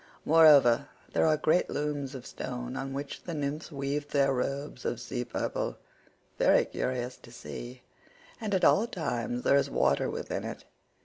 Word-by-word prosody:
Moreover, 145 -4 +6 0.2
there - - +3
are 155 -1 +4
great 155 +3 +2
looms 145 -2 -3
of 130 -1 -8
stone 125 0 -5
on 135 0 -4
which 140 +1 -5
the 170 - -5
nymphs 150 +2 -3
weave 145 +1 -3
their 140 -2 +3
robes 135 0 -3
of 120 - -2
sea 120 +1 -4
purple—very - - -1
curious 125 0 -3
to - - -16
see—and 195 - -8
at 185 - +3
all 220 +4 +5
times 125 - -3
there - - +4
is 140 - +1
water 70 +1 +2
within - - -4
it. - - -7
140 Hz, 150 wpm, -29 LUFS, 125-150 Hz, 0.2 s, Moreover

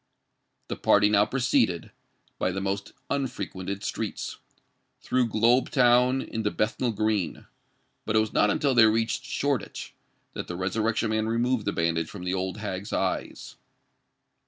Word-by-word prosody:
The - - -3
party 105 0 +4
now 105 0 +4
proceeded, 115 -9 +1 0.5
by 95 - +1
the 95 - -3
most 100 0 -3 0.2
unfrequented 100 -7 -3
streets, - - -4 0.6
through 125 -1 +1
Globe 115 +3 +3
Town 125 +1 +4
into 110 -2 -2
Bethnal 115 +4 -1
Green; 110 -4 -1 0.6
but 105 - -1
it - - +6
was 110 -1 -1
not 105 - +4
until 140 +5 +1
they 115 -3 +7
reached 115 +3 0
Shoreditch, 130 -4 -2 0.4
that - - -5
the 90 - -5
Resurrection 110 +4 0
Man 110 0 0
removed 115 0 0
the 100 - +1
bandage 85 -2 0
from 100 -3 -8
the 90 0 -1
old 95 +1 -2
hag's 100 -1 -5
eyes. - - -3
110 Hz, 145 wpm, -27 LUFS, 95-120 Hz, 0.6 s, they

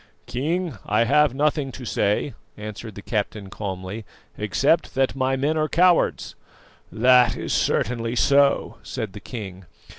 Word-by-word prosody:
"King, 155 - -2
I 105 +2 +3
have 145 +1 +3
nothing 145 -1 0
to 130 - -8
say," 105 +5 0 0.2
answered 105 0 -8
the 100 - -9
captain 105 -2 -3
calmly, 95 +1 -5 0.3
"except 130 - +1
that 135 0 +1
my 135 0 +1
men 145 +4 0
are 155 0 0
cowards." 180 +1 +2 0.6
"That 125 0 +5
is - - -3
certainly 115 0 0
so," 140 +2 +3
said 110 -6 -5
the - - -8
king. 95 -6 -8
125 Hz, 140 wpm, -23 LUFS, 105-140 Hz, 0.6 s, That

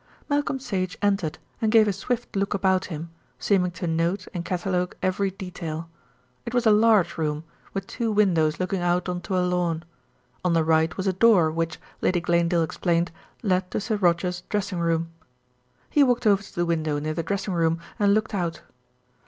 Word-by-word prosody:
Malcolm 285 -2 0
Sage 195 -7 -3
entered 195 -6 +1 0.2
and 220 -1 +2
gave 220 -1 +6
a 205 - +1
swift 240 +5 -3
look 200 +1 0
about 190 -1 +2
him, 165 -1 -6 0.3
seeming 185 -3 +2
to 175 +1 -6
note 170 +3 0
and 175 -2 -3
catalogue 180 0 -1
every 195 +1 +1
detail. 170 -4 -6 0.5
It 235 - -5
was 245 -1 +2
a 220 - +6
large 210 -6 +4
room, 150 -1 -1 0.3
with 195 0 -2
two 230 +2 -2
windows 170 -7 +2
looking 185 0 -1
out 175 +1 +1
on 180 -1 -2
to 185 +1 -2
a 180 - +2
lawn. 175 -2 0 0.6
On 180 -2 +2
the 165 -1 +3
right 160 0 +2
was 190 - -2
a 190 - +2
door, 185 -5 +5
which, 165 0 -2 0.2
Lady 180 -1 +2
Glanedale 170 0 +2
explained, 170 +1 0 0.3
led 185 -3 +1
to - - -2
Sir 220 +1 -1
Roger's 180 -1 +1
dressing 200 -3 -1
room. 165 0 0 0.8
He 295 - +4
walked 245 -2 +2
over 200 -2 +4
to 205 - -14
the 175 - +1
window 160 -3 0
near 155 +1 -2
the 165 - -2
dressing 195 +3 -2
room 165 -1 +1 0.2
and 200 -1 +4
looked 215 +1 -1
out. 170 -4 -2
180 Hz, 185 wpm, -25 LUFS, 170-200 Hz, 0.8 s, gave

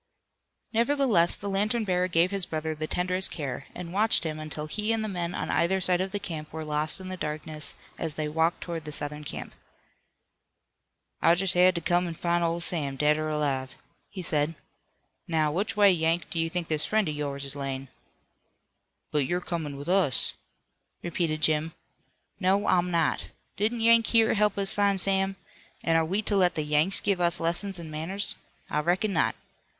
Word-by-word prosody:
Nevertheless, 235 -7 +3
the 200 - -6
lantern 210 +4 0
bearer 180 -2 +1
gave 175 +1 +2
his 195 -3 +2
brother 160 0 -3
the 155 0 -5
tenderest 185 +2 +2
care, 140 -3 -5
and 175 -1 -7
watched 215 0 +4
him 155 -2 -4
until 155 0 -5
he 210 +8 -1
and 225 -1 0
the - - -2
men 175 -3 -3
on - - -3
either 190 +3 +2
side 180 -1 +2
of 190 0 -3
him 165 -6 -4
were 160 0 -6
lost 150 +3 0
in 185 0 -8
the 185 - -4
darkness 155 -1 -2 0.2
as 160 -2 -3
they 155 -1 -2
walked 160 +3 0
toward 165 -3 -5
the 150 - -6
Southern 150 +1 -2
camp. - - -6 1.7
"I 170 - +5
jest 190 +1 +4
had 180 +1 +5
to 170 - -2
come 175 +1 +1
an' 165 - -5
find 170 +1 0
old 170 0 -1
Sam, 145 -6 -1
dead 150 +2 +2
or 155 0 -2
alive," 140 -4 -1 0.3
he 190 -3 -7
said. 155 0 0 0.7
"Now, 155 -2 +1
which 200 +7 -2
way, 205 -1 +7
Yank, 165 0 0
do 165 - -1
you 165 0 +1
think 175 0 -3
this 155 -1 +1
friend 215 -2 +1
of 155 - -2
yours 140 -1 -4
is 140 +1 -6
layin'?" 135 -1 -4 1.2
"But 145 -3 +1
you're 175 +4 0
comin' 160 -5 -4
with 140 - -8
us," 180 - +2 0.7
repeated 165 -2 -2
Jim. 155 +1 +1 0.6
"No, 195 +2 +2
I'm 180 0 +2
not. 165 -3 0 0.3
Didn't 225 +3 -1
Yank 230 0 +5
here 225 -1 +4
help 210 -1 +1
us 200 +1 0
find 200 -1 +2
Sam? 195 +1 +3 0.5
An' 165 - +2
are 165 - +4
we 195 +7 -1
to 210 - +2
let 180 -3 +3
the 155 - -1
Yanks 150 +5 +2
give 195 -3 0
us 170 -1 +3
lessons 175 +4 +1
in 165 -2 -5
manners? 180 +6 -2 0.3
I 150 - -1
reckon 185 +6 0
not. 165 - +1
170 Hz, 190 wpm, -27 LUFS, 155-195 Hz, 1.7 s, way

